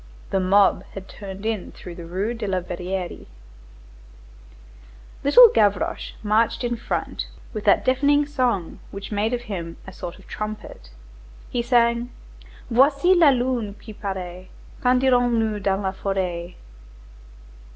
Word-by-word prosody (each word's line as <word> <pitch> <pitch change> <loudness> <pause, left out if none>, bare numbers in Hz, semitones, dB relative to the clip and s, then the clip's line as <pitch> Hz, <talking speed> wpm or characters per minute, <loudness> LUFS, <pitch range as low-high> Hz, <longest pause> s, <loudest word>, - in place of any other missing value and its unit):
The 195 - +2
mob 195 +2 +4
had 195 -1 -7
turned 195 0 -9
in 220 -4 -2
through 175 - -10
the 170 -1 -9
Rue 195 +7 -2
de 230 -3 -5
la 190 -1 0
Verrerie. 180 +1 -5 2.0
Little 475 - +9
Gavroche 205 - +1
marched 220 +3 +2
in 240 0 0
front 235 - -3 0.3
with 215 -2 -5
that 200 - +4
deafening 285 +3 +3
song 250 - -1
which 200 +1 -8
made 210 +2 0
of 245 -1 -1
him 175 -8 -6
a 190 - -10
sort 175 -1 -7
of - - -17
trumpet. 215 - -7 0.6
He 245 - 0
sang: 235 0 +2 0.6
"Voici 280 +8 +5
la 340 -5 +6
lune 245 -5 0
qui 215 - -11
paraît, 185 -3 -6 0.3
Quand 250 0 +3
irons 245 -2 +4
nous 220 -2 0
dans 195 -1 0
la 190 - 0
forêt? 185 -3 -3
210 Hz, 140 wpm, -23 LUFS, 190-245 Hz, 2.0 s, Little